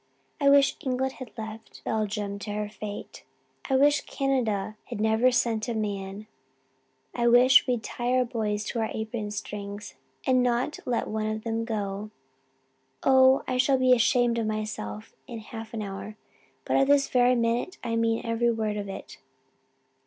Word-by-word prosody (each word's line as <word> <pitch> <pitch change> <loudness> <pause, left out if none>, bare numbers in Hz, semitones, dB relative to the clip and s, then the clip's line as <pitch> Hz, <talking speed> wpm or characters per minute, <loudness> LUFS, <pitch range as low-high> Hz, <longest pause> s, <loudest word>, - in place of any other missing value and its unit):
I 280 -1 +4
wish 280 -1 +5
England 265 0 -1
had 255 - -7
left 220 0 -8
Belgium 210 -2 -2
to 205 - -6
her 210 0 -3
fate 210 -1 -8 0.5
I 265 - +3
wish 285 +1 +4
Canada 230 -9 -1
had - - -6
never 220 +3 +3
sent 230 -2 0
a 235 - -2
man 200 -1 -4 0.9
I 240 -1 +1
wish 245 +3 +6
we'd 245 -3 0
tied 245 +1 -2
our 255 -1 +3
boys 215 -4 -2
to 230 - -3
our 220 - 0
apron 220 -1 -4
strings 205 0 -6 0.3
and 255 -1 +4
not 245 +4 0
let 245 -2 0
one 215 0 -2
of 215 0 -3
them 230 0 -2
go. 205 -2 -3 0.9
Oh 265 0 +5
I 255 - 0
shall 265 +1 +3
be 255 0 +5
ashamed 240 -1 +3
of 225 - -1
myself 215 - -4
in 235 - -6
half 225 0 -8
an 220 -2 -4
hour 200 +2 -7 0.5
but - - +1
at 270 - +4
this 285 -1 +4
very 250 0 +4
minute 235 +8 0
I 230 -2 -1
mean 230 0 +1
every 230 +1 +1
word 215 -2 -2
of 200 -1 -4
it. 195 - -8
225 Hz, 165 wpm, -27 LUFS, 210-250 Hz, 0.9 s, wish